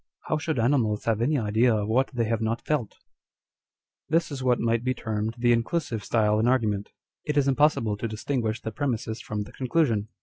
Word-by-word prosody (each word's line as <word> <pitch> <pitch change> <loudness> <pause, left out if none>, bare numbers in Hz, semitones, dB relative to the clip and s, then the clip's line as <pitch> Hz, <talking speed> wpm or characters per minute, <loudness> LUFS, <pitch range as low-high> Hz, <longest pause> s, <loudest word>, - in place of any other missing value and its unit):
How 155 - +1
should 160 -1 -2
animals 115 -3 +1
have 115 -1 +1
any 145 +5 +2
idea 110 +1 +2
of 105 -1 -1
what 125 +5 +2
they 120 -3 0
have 115 0 -1
not 115 +1 -1
felt 140 -9 -1
?" - - -42
1 160 - +3
This 165 -2 -2
is 135 -2 -5
what 125 -2 +2
might 115 0 +1
be 130 0 0
termed 110 -1 -3
the 120 0 +3
inclusive 120 - -1
style 105 -1 +2
in 115 - +2
argument. 110 -6 +1 0.3
It 150 -1 -2
is 140 -1 +3
impossible 135 -6 +2
to 115 - -3
distinguish 110 0 -2
the 110 - -3
premises 115 -2 -2
from 105 -1 -4
the 105 - -13
conclusion. 130 -6 0
115 Hz, 205 wpm, -26 LUFS, 110-135 Hz, 0.3 s, 1